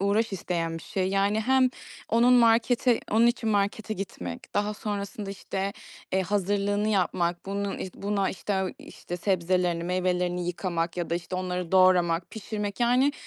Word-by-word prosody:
uğraş 205 +2 +1
isteyen 165 -3 -2
bir - - -12
şey, 185 -1 -1
yani. 200 +2 +2
Hem 260 +2 +4 0.4
onun 235 +2 +4
markete 235 0 +4
onun 225 +3 +5
için 235 -1 +1
markete 210 +1 0
gitmek, 90 - -7
daha 205 +1 0
sonrasında 200 -1 -4
işte, 195 0 -3 0.4
eee, 190 0 +2
hazırlığını 205 +2 0
yapmak, 175 -4 0
bunun 200 0 -2
işte 185 - -7
buna 200 -1 +1
işte 190 0 -2
işte 175 - -8
sebzelerini, 180 -2 0
meyvelerini 180 0 0
yıkamak 170 -1 -2
ya 175 -2 -3
da - - +1
işte 175 +1 -4
onları 180 -1 -3
doğramak, 180 -2 +4
pişirmek 210 -1 -5
yani; 250 +4 +4
195 Hz, 150 wpm, -27 LUFS, 180-210 Hz, 0.4 s, onun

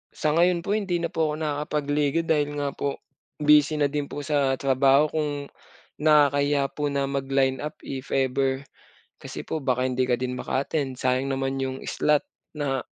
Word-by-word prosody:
Sa 155 - 0
ngayon 170 +1 +3
po 200 - -3
hindi 190 -5 0
na 170 - -2
po 160 -3 +1
ako - - -3
nakakapagliga 150 0 0
dahil 145 -2 0
nga 140 -1 -1
po 140 0 -4 0.4
busy 150 0 +5
na 145 -2 +1
din 145 -1 -2
po 145 - -6
sa 140 -3 +1
trabaho 135 +2 +3
kung, 150 -2 -1 0.7
nakakahiya 145 -2 +3
po 145 -1 -1
na 140 -1 0
mag 140 -1 -2
lineup 135 +2 0
if 135 -1 -6
ever. 135 0 +1 0.6
Kasi - - -7
po 160 - -3
baka 130 -2 +1
hindi 130 0 0
ka 120 - +3
din 125 +1 -3
maka-attend 135 +1 -2
sayang 130 +1 0
naman 135 0 -1
'yung 130 0 -4
slot 150 -1 +1 0.3
na 135 -3 -1
140 Hz, 170 wpm, -25 LUFS, 135-150 Hz, 0.7 s, busy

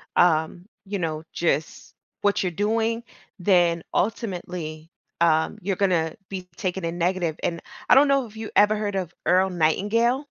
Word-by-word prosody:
um, 175 +2 +2 0.2
you 200 +1 -3
know, 160 -2 -3
just 155 -3 -2 0.3
what 205 0 +2
you're 180 -2 -1
doing, 225 +4 0 0.4
then 175 -3 +3
ultimately, 175 -6 -3 0.3
um, 160 -1 +3
you're 195 +1 -1
gonna 175 -5 +1
be 185 -2 -6
taken 190 -4 -3
in 165 +1 -3
negative, 175 -2 0
and 170 -1 -1 0.3
I - - +8
don't 280 +2 +7
know 275 -2 +2
if 220 0 -13
you 220 -1 -5
ever 210 +1 +5
heard 205 -2 -2
of 180 -3 -3
Earl 185 +1 +4
Nightingale? 220 - +1
185 Hz, 155 wpm, -24 LUFS, 170-210 Hz, 0.4 s, I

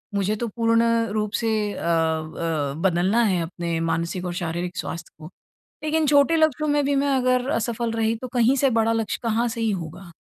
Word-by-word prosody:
मुझे 200 +2 +1
तो 235 +2 -3
पूर्ण 230 +1 +2 0.3
रूप 210 -1 -1
से 215 -2 0
अ - - -8
अ, 160 -3 -1
बदलना 190 +6 +2
है 185 -5 +1
अपने 170 -1 -3
मानसिक 170 +3 -2
और 175 - -3
शारीरिक 175 +2 -4
स्वास्थ्य 170 0 -5
को। 155 +1 -10 0.5
लेकिन 310 0 +1
छोटे 285 +3 +4
लक्ष्यों 310 -1 +2
में 290 0 +2
भी 285 - +1
मैं 280 +1 +1
अगर 255 +1 +1
असफल 230 -1 -1
रही, 225 0 0
तो 255 +3 -7
कहीं 245 +2 +3
से 275 0 +3
बड़ा 225 -1 +2
लक्ष्य 225 -2 -2
कहाँ 230 +1 +1
से 230 0 -4
ही 225 -1 +1
होगा। 175 0 -6
220 Hz, 195 wpm, -23 LUFS, 175-245 Hz, 0.5 s, छोटे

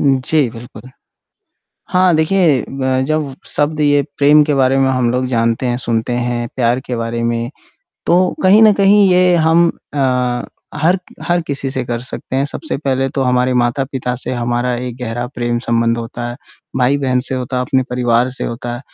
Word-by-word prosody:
उ, - - -1 0.2
जी, 150 -5 +2
बिल्कुल। 120 +1 -12 1.0
हाँ, 185 -1 +3
देखिए 160 -3 +2
ब 130 -1 -1
जब 155 -3 -1
शब्द 150 +1 -1
ये 145 -1 +3 0.2
प्रेम 150 +1 +5
के 150 -1 0
बारे 135 0 +2
में 135 0 +2
हम 125 -2 +1
लोग 125 +1 0
जानते 115 0 0
हैं, 120 -1 0
सुनते 115 -1 -2
हैं, 120 0 -2
प्यार 120 -1 +1
के 125 - -3
बारे 115 0 -3
में, 115 0 -1 0.6
तो 180 +1 +3
कहीं 200 +4 +6
न 215 - +7
कहीं 200 0 +5
ये 180 0 +4
हम 165 +1 +4 0.3
अ, 125 -3 0 0.4
हर 180 +4 +3 0.2
हर 175 0 +1
किसी 140 -1 -2
से 130 -2 -2
कर 120 -1 -3
सकते 130 +1 -5
हैं। 135 - +1
सबसे 310 - -5
पहले 135 -2 -1
तो 135 +1 -2
हमारे 125 0 +1
माता-पिता 125 +1 -1
से 130 - -4
हमारा 120 0 -1
एक 125 0 -5
गहरा 120 +1 -3
प्रेम 120 0 -1
संबंध 115 0 +1
होता 120 +1 -5
है, 120 - -6 0.4
भाई-बहन 130 0 +1
से 130 - -2
होता 130 0 -3
है, 125 - 0
अपने 130 +1 +1
परिवार 125 0 +1
से 130 - -5
होता 120 +1 -4
है। - - -9
130 Hz, 185 wpm, -16 LUFS, 120-145 Hz, 1.0 s, न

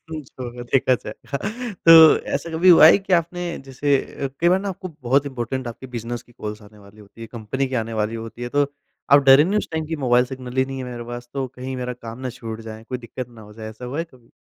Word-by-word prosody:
जो 150 -5 -9
होगा, 120 0 -7
देखा 130 -1 +4
जाएगा। 140 +6 -6 0.5
तो 165 - +10 0.4
ऐसा 145 +4 -3
कभी 165 +3 +2
हुआ 165 -3 +9
है 170 - +7
कि 195 -1 -5
आपने, 175 +1 +1 0.2
जैसे 140 +2 +1 0.3
अ, - - +2
कई 170 - +4
बार 185 +1 +4
ना 200 - -4
आपको 185 0 -6
बहुत 135 +4 +2
इम्पॉर्टेन्ट 130 -1 -4
आपके 125 +3 -9
बिज़नेस 120 +1 -4
की 120 - -23
कॉल्स 105 -1 -7
आने 105 +1 -17
वाली 100 +1 -17
होती 105 +2 -17
हैं, 115 - -7
कंपनी 120 +4 -2
की 130 - -5
आने 115 +1 -7
वाली 105 +2 -2
होती 115 +2 -9
है, 120 - -3
तो 145 +2 +2 0.4
आप 140 0 +8
डरे 135 +3 +9
नहीं 205 +4 +1
उस - - -4
टाइम 160 -1 -1
कि, 160 0 -3
"मोबाइल 120 +1 +4
सिग्नल 130 -1 -8
ही 130 - +4
नहीं 135 0 -6
है 130 - -4
मेरे 120 -1 -7
पास, 120 0 -8
तो 135 -1 -1
कहीं 130 +1 -5
मेरा 125 0 -3
काम 115 +2 -7
ना 125 - -3
छूट 115 -1 -6
जाए, 110 0 -9
कोई 125 +1 -5
दिक्कत 125 +1 -7
ना 115 -2 -15
हो - - -13
जाए।"? 110 0 -8
ऐसा 110 +3 -11
हुआ 135 +5 -5
है 165 - 0
कभी? 120 -2 -22
125 Hz, 260 wpm, -22 LUFS, 115-145 Hz, 0.5 s, तो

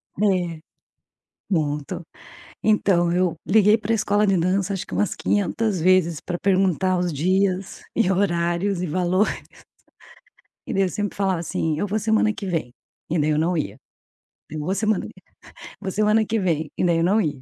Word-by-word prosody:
É. 180 -5 0 0.9
Muito. 155 +1 -1 0.6
Então, 195 -5 +3
eu 180 -1 +1
liguei 210 +2 +5
para 220 +1 -1
escola 210 -1 +2
de 195 -1 +3
dança 185 +3 0
acho 195 +2 -5
que - - -14
umas 210 - 0
quinhentas 205 0 0
vezes 170 -2 +3
para 175 -1 -4
perguntar 185 -1 +2
os 180 0 0
dias, 185 +5 0
e 210 -5 +2
horários 175 0 0
e - - -1
valores. 185 +4 +1 1.4
E - - -3
daí 195 - +2
eu 185 - 0
sempre 205 +2 -3
falava 190 -3 0
assim: 160 -1 -2
"Eu 205 - -1
vou 210 +2 -1
semana 220 0 +2
que 205 - -7
vem", 165 -9 -2 0.4
e 165 +1 0
daí 150 +1 +1
eu 150 - +1
não 170 +2 +1
ia. 155 - -3 0.7
"Eu 155 +1 -5
vou 180 +6 -1
semana 215 0 0
que - - -14 0.6
vou 190 - -3
semana 215 +2 +2
que 225 +1 -1
vem", 160 -5 -1
e - - +1
daí 170 -2 +3
eu - - +1
não 200 +5 +3
ia. 145 -7 -3
185 Hz, 175 wpm, -23 LUFS, 170-205 Hz, 1.4 s, liguei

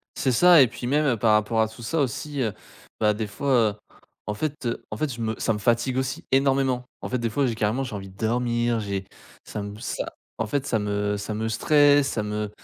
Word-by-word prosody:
C'est 130 - +1
ça 175 +4 +7
et 130 - +6
puis 120 +2 -6
même, 150 +3 +2
heu, 120 -5 +2
par 110 0 +3
rapport 110 +1 +2
à 110 - +2
tout 110 +2 -13
ça 150 +8 -1
aussi, 140 +2 -2
heu, 110 -5 0 0.5
bah 105 -1 +3
des 105 0 -3
fois, 140 +7 -2 0.2
heu, - - -9 0.5
en 105 - -1
fait, 145 +3 -4
heu 115 - -2
en - - -4
fait 150 -5 -1
je 115 - -7
me 110 0 -1
ça 115 - +1
me - - -3
fatigue 120 +4 +1
aussi 135 +6 -2
énormément 135 -2 +2 0.2
en - - -5
fait 125 - 0
des 115 -1 -1
fois 135 +4 +1
j'ai 115 - -2
carrément 110 +5 0
j'ai 115 -5 -5
envie 95 -1 -7
de 95 - -18
dormir. 120 0 0
J'ai 100 -2 -3 0.4
ça 105 - -5
me 100 +1 -7
ça - - -3 0.3
en 110 - -1
fait 140 +4 -1
ça 110 - +1
me 105 0 -1
ça 105 +2 -4
me 110 +1 -2
stresse 145 +4 +4
ça 105 - -2
me 105 0 -2
en - - -12
115 Hz, 250 wpm, -25 LUFS, 105-135 Hz, 0.5 s, ça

